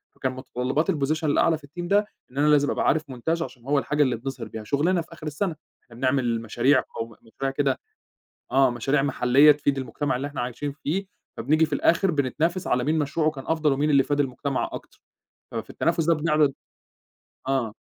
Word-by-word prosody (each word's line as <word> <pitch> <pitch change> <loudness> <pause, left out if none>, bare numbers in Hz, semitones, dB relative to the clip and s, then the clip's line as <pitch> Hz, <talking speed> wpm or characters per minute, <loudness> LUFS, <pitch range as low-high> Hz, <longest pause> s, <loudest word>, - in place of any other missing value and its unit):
فكان 130 - -2
متطلبات 130 +5 -1
الPosition 155 0 -1
الأعلى 155 +2 +3
في 145 - -15
team 175 +4 -7
ده 200 +4 +2 0.3
إن 135 - -13
أنا 150 - +3
لازم 145 -1 +4
أبقى - - 0
عارف 155 +1 +3
montage 160 +7 -2
عشان 125 -7 -6
هو 140 0 +2
الحاجة 150 +4 +1
اللي 125 -3 +1
بنظهِر 125 0 -6
بيها 110 -1 -7
شغلنا 160 - +1
في 165 - -12
آخر 160 -2 -8
السنة، 160 +3 -2 0.3
إحنا 120 - -17
بنعمل 125 -3 0
مشاريع 120 +4 +2
قوم 115 0 -4
مشاريع 135 +4 -4
كده 135 -1 0 0.7
آه، 135 0 +5
مشاريع 135 +4 +1
محلّية 140 +1 +5
تفيد 145 -1 0
المجتمع 135 +1 -2
اللي 135 +3 -3
إحنا 145 -3 -5
عايشين 125 +4 -3
فيه 160 +7 -3 0.3
فبنيجي 155 +2 +3
في 155 - -6
الآخر 175 +6 +3
بنتنافس 160 +5 0
على 125 0 +1
مين 155 +3 +1
مشروعه 155 +2 +1
كان 135 -3 -9
أفضل 160 -2 +2
ومين 145 +3 0
اللي 140 -2 +5
فاد 145 +1 -1
المجتمع 135 0 -1
أكتر، - - -10 0.5
ففي 115 -1 -5
التنافس 165 -1 0
ده 165 - +4
بنعرض 150 -2 +2 1.0
آه. 125 -6 0
145 Hz, 190 wpm, -25 LUFS, 130-155 Hz, 1.0 s, آه